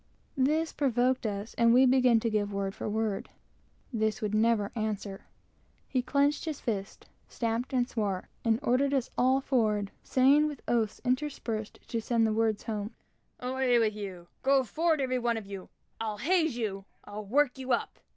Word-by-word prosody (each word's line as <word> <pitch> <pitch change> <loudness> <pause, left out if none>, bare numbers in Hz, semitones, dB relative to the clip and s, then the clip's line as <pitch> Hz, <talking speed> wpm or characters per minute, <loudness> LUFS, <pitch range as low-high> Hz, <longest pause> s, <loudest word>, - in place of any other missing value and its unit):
This 305 +5 +1
provoked 255 -2 +1
us, 205 +1 -4
and 235 0 +5
we 260 +1 +7
began 250 -2 +5
to 230 - 0
give 205 -1 0
word 195 -1 -2
for 215 - -4
word. 215 -2 -2 0.6
This 220 -1 0
would 210 -1 -2
never 215 -1 +2
answer. 210 -3 -4 0.6
He 255 - 0
clenched 285 +4 +1
his 310 -3 -4
fist, 200 -4 -4 0.2
stamped 230 +2 -2
and 250 -2 +1
swore, 200 -6 -2 0.2
and 225 -1 +2
sent 275 +1 +1
us 260 -3 -1
all 260 +2 +3
forward, 215 -7 +1
saying, 275 +4 +4
with 295 -4 -7
oaths 225 -3 +1
enough 250 - +3
interspersed 250 -6 -3
to 230 - -2
send 230 0 +2
the 220 - +1
words 220 -1 +1
home, 210 -1 -4 0.4
"Away 255 -1 +1
with 220 -2 +2
you! 190 -4 -7 0.2
go 270 0 +4
forward 315 +5 +1
every 255 -1 0
one 235 -1 0
of 220 - -6
you! 195 -1 -8 0.3
I'll 215 -2 -3
haze 320 - +1
you! 195 -4 -3 0.2
I'll 210 +1 -7
work 265 +5 +1
you 260 0 -4
up! - - -1
235 Hz, 175 wpm, -29 LUFS, 215-260 Hz, 0.6 s, we